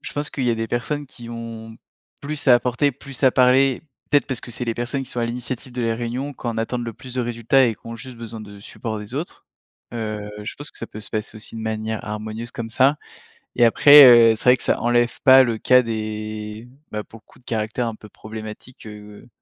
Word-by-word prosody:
je - - -7
pense 145 +1 -2
qu'il 135 - -3
y 120 - +2
a - - +1
des 115 0 -2
personnes 145 +6 -3
qui 120 -2 -12
vont 115 -1 -8 0.4
plus 145 0 -2
à 125 - +9
apporter, 125 +4 +1
plus 135 0 -10
à 130 - +6
parler, 130 +1 +3 0.3
peut-être, 145 -1 +3
parce 130 -4 -2
que - - -9
c'est 120 +2 -3
les 115 -1 -2
personnes 125 +3 -3
qui 130 - -8
sont 120 - -3
à 115 - +1
l'initiative 125 +1 -5
de 125 0 -3
la 115 -1 0
réunion, 120 +5 -4
qui 130 - -10
en 115 -1 -3
attendent 120 +2 -2
le 115 - -5
plus 125 +3 -11
de 130 - 0
résultats 120 +2 +2
et 115 - -1
qui - - -20
ont 115 - -6
juste 125 +2 -10
besoin 115 -1 -8
de 100 -1 -11
support 110 +2 -6
des 105 +3 -9
autres, 155 +6 -6 0.5
heu, 110 -2 -4
je 105 - -6
pense 145 +1 -8
que - - -9
ça 115 - -5
peut 110 - -9
se 105 - -10
passer 110 0 -4
aussi 105 - -9
de - - -5
manière 110 0 -3
harmonieuse 110 +2 -6
comme 115 -1 -6
ça 135 +5 +3 0.6
et 120 - +5
après, 145 +5 +9 0.3
heu, - - -4
c'est - - -4
vrai 125 0 +7
que - - -2
ça - - +2
enlève 120 0 +1
pas 135 -1 +8
le 115 -3 -1
cas 125 +3 +5
des, 110 -1 -5 0.2
bah, 105 0 -4
pour 115 +1 -15
le - - -28
coup, - - -20
de - - -27
caractères 110 +2 -2
un 115 - -4
peu 105 - -14
problématiques, 110 +4 -10
heu, 105 0 -12
115 Hz, 245 wpm, -22 LUFS, 110-125 Hz, 0.6 s, à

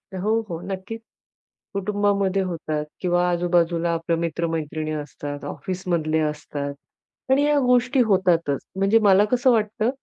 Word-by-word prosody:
हो, 215 +5 +1
हो, 165 -1 -4
नक्कीच. 195 +4 -6 0.7
कुटुंबामध्ये 200 -1 +1
होतात, 155 -4 -3 0.2
किंवा 175 -1 +2
आजूबाजूला 170 -1 +1
आपल्या 165 0 -1
मित्र-मैत्रिणी 160 -2 -2
असतात, 145 -1 -6
ऑफिसमधले 175 -4 -2
असतात, 150 -2 -3 0.6
आणि 275 +2 +4
या 295 0 +3
गोष्टी 250 +2 +3
होतातच. 175 -8 +2 0.2
म्हणजे 195 +4 +3
मला 200 -1 +5
कसं 250 +1 +4
वाटतं? 220 0 +1
180 Hz, 120 wpm, -23 LUFS, 160-205 Hz, 0.7 s, मला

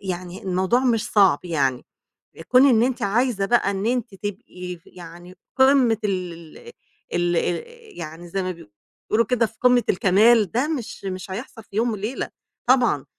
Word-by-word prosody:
يعني 180 -1 -6
الموضوع 190 +6 +1
مش 230 -4 +1
صعب، 195 -8 +4
يعني 140 -7 -1 0.6
كون 255 +2 +6
إن 230 -3 +4
أنتِ 255 0 -1
عايزة 215 0 +1
بقى 235 -2 +2
إن 195 +1 -3
أنتِ 240 -3 -1
تبقي 185 -3 -7
ف 165 - -29
يعني 175 +1 -12 0.2
قمّة 265 -4 +4
ال 175 -5 -4 0.6
ال 175 0 +1
ال 170 +1 -1 0.3
يعني 165 +1 -8
زي 190 +2 -3
ما 185 - -2
بي 170 - -13 0.4
بيقولوا 230 +2 +3
كده 240 0 +1
في 220 0 -10
قمّة 250 -1 +4
الكمال، 205 +3 +4
ده 250 +6 0
مش 265 -10 -5
مش 185 0 -5
هيحصل 225 +2 -7
في 200 - -16
يوم 230 +2 +1
وليلة 215 +4 -4 0.4
طبعًا، 245 - +3
200 Hz, 165 wpm, -23 LUFS, 180-240 Hz, 0.6 s, كون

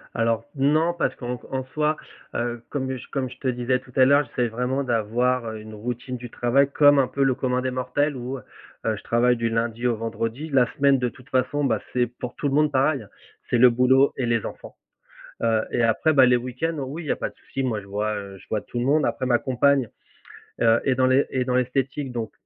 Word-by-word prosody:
Alors, 115 0 0
non, 155 +5 +2
parce 170 - -1
qu'en 125 -1 -5
en 130 0 -2
soi, 155 0 +1 0.4
heu, 120 -1 -2
comme 130 -2 -2 0.2
comme 130 -2 -2
je - - -12
te 135 - -3
disais 125 +1 0
tout 125 - -18
à 130 - +6
l'heure, 140 +2 +5
j'essaie 125 -2 -1
vraiment 125 +4 -1
d'avoir, 120 +1 0
heu, 110 -1 -5
une 110 0 -10
routine 125 +4 -5
du 120 0 -9
travail 135 +4 +2
comme 145 -1 +6
un 130 - +3
peu 140 +2 -1
le 135 -1 +3
commun 125 -1 -1
des 130 0 -2
mortels, 130 +3 -1
où, 130 +2 -5
heu 125 - -12 0.4
heu, 110 -1 +1
je - - -10
travaille 120 +1 +2
du 115 0 0
lundi 115 +1 -1
au 120 - +1
vendredi. 115 +6 -4
La 125 -3 +3
semaine 140 -2 +4
de 125 -1 0
toute 125 +1 -18
façon, 130 +3 0
bah, 135 - +1
c'est 125 -1 +2
pour 120 +1 -8
tout 145 - -2
le 135 - -1
monde 150 +1 +3
pareil, 135 +1 +2
hein, 105 - -14 0.4
c'est 120 - +2
le 125 0 +7
boulot 130 +3 +4
et 125 - -1
les 115 -2 0
enfants, - - -9 0.7
heu 115 -1 +3
et 120 - +1
après, 115 +8 +2
bah, 135 -2 +7
les 125 0 +5
week-ends, 130 +7 -3
oui, 160 +6 -6
il - - -9
y - - -1
a - - +1
pas - - -3
de - - -18
souci, 135 - -5
moi, 110 -5 -1
je - - -15
vois, 105 +2 -2
heu, 100 -1 -7
je - - -18
vois 110 - -1
tout 120 - -6
le 120 - -1
monde, 150 +2 +3
après 130 - -1
ma 120 -1 +3
compagne, 130 -1 +2 0.7
heu, 115 0 +5
est 130 -2 +2
dans 130 - +3
l'es 130 +2 +3
est 130 - 0
dans 125 0 -1
l'esthétique 130 +1 -1
donc 115 -3 -4
125 Hz, 245 wpm, -24 LUFS, 120-135 Hz, 0.7 s, le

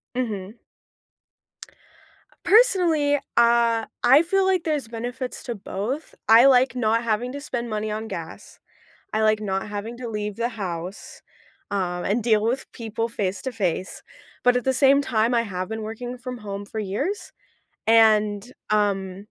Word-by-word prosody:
Mhm. 215 -4 -3 1.9
Personally, 350 -11 +4 0.2
uh, 235 -1 +4 0.2
I 270 +5 +7
feel 385 +3 +1
like 375 -3 +1
there's 300 -7 -1
benefits 245 +3 -5
to 240 - -4
both. 215 +8 -5
I 230 +3 +8
like 260 -1 +5
not 230 -1 +1
having 230 +2 -1
to 285 - -6
spend 240 -5 -4
money 215 0 -2
on 215 +1 -4
gas, - - -8 0.6
I 215 - +1
like 215 0 +3
not 195 -1 -2
having 210 +3 -6
to 245 -1 -6
leave 210 -2 -4
the 235 +1 0
house, 185 -4 -6 0.5
um, 180 -3 -2
and 215 +3 0
deal 215 -2 +3
with 250 +4 -2
people 230 -1 -4
face 195 -4 -2
to 260 - -3
face. 185 -4 -2 0.4
But 250 0 +4
at 250 - 0
the 265 - +1
same 275 +1 +5
time, 230 -2 +1
I 235 - +3
have 185 -5 -4
been 220 0 -4
working 240 +3 -6
from 250 0 -7
home 200 -2 -6
for 220 - -6
years 220 - -3 0.6
and, 215 0 +4 0.2
um, 200 -2 0
225 Hz, 155 wpm, -24 LUFS, 210-250 Hz, 1.9 s, I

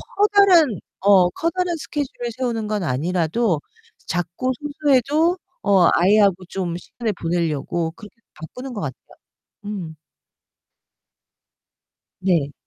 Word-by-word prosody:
커다란 390 - +5 0.2
어 190 -3 +5
커다란 345 - -1
스케줄을 275 -6 -4
세우는 235 -4 -2
건 210 -3 -1
아니라도 170 - 0 0.5
작고 180 +9 -2
소소해도 295 +3 +1 0.3
어 195 -4 +5
아이하고 195 0 +4
좀 180 -3 -3
시간을 220 +4 -4
보내려고 165 -1 -2
그렇게 210 +5 -14 0.2
바꾸는 250 +11 -9
것 205 - -5
같아요. 130 -4 -8 0.5
음. 185 -6 -6 2.2
네. 170 -7 +1
205 Hz, 235 characters per minute, -21 LUFS, 175-265 Hz, 2.2 s, 커다란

